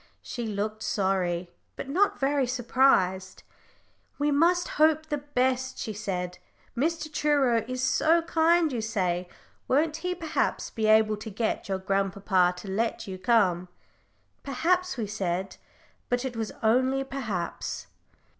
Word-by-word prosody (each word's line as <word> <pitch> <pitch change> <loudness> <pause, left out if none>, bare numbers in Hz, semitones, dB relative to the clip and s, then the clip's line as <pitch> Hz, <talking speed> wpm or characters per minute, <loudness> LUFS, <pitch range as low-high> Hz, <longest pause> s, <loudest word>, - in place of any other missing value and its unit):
She 240 -2 -5
looked 215 +1 -3
sorry, 185 -4 0 0.2
but - - -6
not 370 +9 +2
very 275 -1 +1
surprised. 235 -7 +2 0.7
"We 290 +1 +1
must 345 +5 +3
hope 315 0 +4
the 300 -2 -2
best," 260 -2 -1
she 220 - -4
said. 180 -4 -4 0.4
"Mr. 310 +3 -1
Truro 280 -6 +2
is 255 0 -3
so 325 +6 +3
kind, 330 -1 +3
you 235 - -1
say. 185 -5 -1 0.4
Won't 305 +3 +2
he, 360 +1 -3
perhaps, 325 -3 -1
be 220 -1 -1
able 215 0 +4
to 215 +2 -7
get 220 0 -2
your 190 - 0
grandpapa 190 -1 +1
to 200 - -10
let 225 +4 -1
you 190 -1 -7
come?" 185 -6 +2 0.7
"Perhaps," 345 +5 0
we 225 - -1
said. 190 -2 -3 0.5
But 245 +1 0
it 250 -2 -4
was 225 -1 -3
only 260 +4 +3
"perhaps." 220 -11 -4
235 Hz, 135 wpm, -27 LUFS, 195-290 Hz, 0.7 s, hope